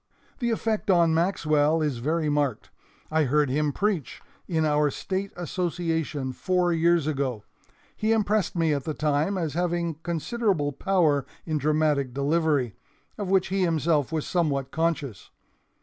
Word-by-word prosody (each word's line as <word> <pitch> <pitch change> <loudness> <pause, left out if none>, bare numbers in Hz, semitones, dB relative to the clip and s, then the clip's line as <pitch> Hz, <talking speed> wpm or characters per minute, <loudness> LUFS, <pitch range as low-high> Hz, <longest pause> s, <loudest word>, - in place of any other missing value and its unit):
"The 240 -3 0
effect 220 -2 -1
on 170 -3 +4
Maxwell 160 -3 +2
is 145 -5 -1
very 155 +5 0
marked. 145 -5 -1 0.4
I 160 -1 +3
heard 145 0 +2
him 150 +1 +1
preach 195 - -2 0.3
in 160 -3 +1
our 150 -1 +2
State 190 +6 -3
Association 165 -6 -2
four 180 +3 +1
years 170 -1 +3
ago. 135 -7 -2 0.5
He 215 +1 0
impressed 215 -3 +1
me 165 -3 +2
at 140 -2 -2
the 155 - -3
time 155 +6 0
as 160 -5 -2
having 170 -2 -1
considerable 170 -1 -1
power 155 -3 +2 0.2
in 155 -2 -1
dramatic 150 -3 +1
delivery, 145 -4 +1 0.5
of 200 -3 -3
which 190 -1 +2
he 195 +1 0
himself 160 -4 +1
was 160 -2 -2
somewhat 140 -6 0
conscious. 155 - -2
160 Hz, 145 wpm, -26 LUFS, 145-175 Hz, 0.5 s, on